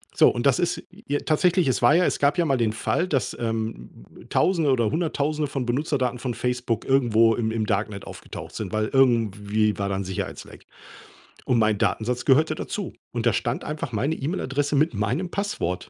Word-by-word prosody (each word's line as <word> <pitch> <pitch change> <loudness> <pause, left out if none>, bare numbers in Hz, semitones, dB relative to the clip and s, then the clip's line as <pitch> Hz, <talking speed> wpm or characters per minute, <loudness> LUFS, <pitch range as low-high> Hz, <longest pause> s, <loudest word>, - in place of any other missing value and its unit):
So - - +6
und 120 - -3
das 135 -3 +4
ist 175 0 -1 0.2
j 145 0 0
tatsächlich, 175 +1 +2
es 130 - +1
war 120 +7 +5
ja 180 - +4
es - - 0
gab 145 +5 +2
ja 175 - +2
mal 135 -4 +2
den 115 -2 +1
Fall, 170 +10 -1
dass, 135 - -1
ähm, 115 - -4 0.2
Tausende 165 -6 +2
oder 120 -5 +2
Hunderttausende 155 -2 -1
von 135 -3 -3
Benutzerdaten 130 -1 -1
von 125 -2 -3
Facebook 125 -1 -2
irgendwo 115 -4 +4
im 110 0 -1
im 110 -1 -1
Darknet 100 -1 -2
aufgetaucht - - -9
sind, 100 -4 -5
weil 110 0 0
irgendwie 110 -5 +2
war 100 0 -1
da 100 - -1
'n 95 - -2
Sicherheitsleck 95 0 -6 0.8
und 125 - +2
mein 110 -2 +3
Datensatz 120 +4 -1
gehörte 155 +3 +4
dazu 200 +4 -4 0.2
und 120 -1 -2
da 120 - +5
stand 120 +3 -2
einfach 150 -4 -5
meine 135 +9 0
E-Mail-Adresse 145 -2 -2
mit 155 +4 +2
meinem 130 - -1
Passwort. 200 - -3
125 Hz, 190 wpm, -24 LUFS, 110-150 Hz, 0.8 s, So